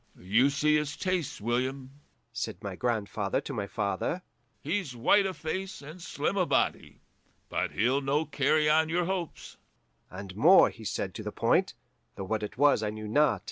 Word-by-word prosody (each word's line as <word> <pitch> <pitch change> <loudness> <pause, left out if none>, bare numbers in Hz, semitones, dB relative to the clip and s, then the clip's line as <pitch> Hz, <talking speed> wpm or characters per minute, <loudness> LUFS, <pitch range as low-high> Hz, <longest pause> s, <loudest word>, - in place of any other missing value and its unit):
'You 110 +10 +3
see 150 +2 +2
his 150 -1 -3
tastes, 180 -6 -2
William,' 130 +4 -2 0.3
said - - -4
my - - -5
grandfather 105 -4 -1
to 140 - -6
my 105 -5 -3
father; 105 - -2 0.4
'he's 160 -4 -3
white 195 - +4
o' 190 - -3
face 185 +5 -5
and 155 +5 -10
slim 165 +3 -2
o' 185 - +3
body, - - -1 0.5
but - - -2
he'll 125 +7 +2
no 145 +3 0
carry 150 +1 +2
on 155 +1 +3
your 175 +1 +1
hopes.' 180 -3 -5 0.5
And 95 0 -9
more 170 - +6
he 110 - -12
said 100 -2 -3
to - - -6
the - - -5
point, - - +1 0.4
though 95 - -5
what 110 +3 -2
it 105 +3 -6
was 145 -4 +4
I 105 - -1
knew 110 0 -6
not. 150 +8 +3
140 Hz, 180 wpm, -29 LUFS, 110-160 Hz, 0.5 s, more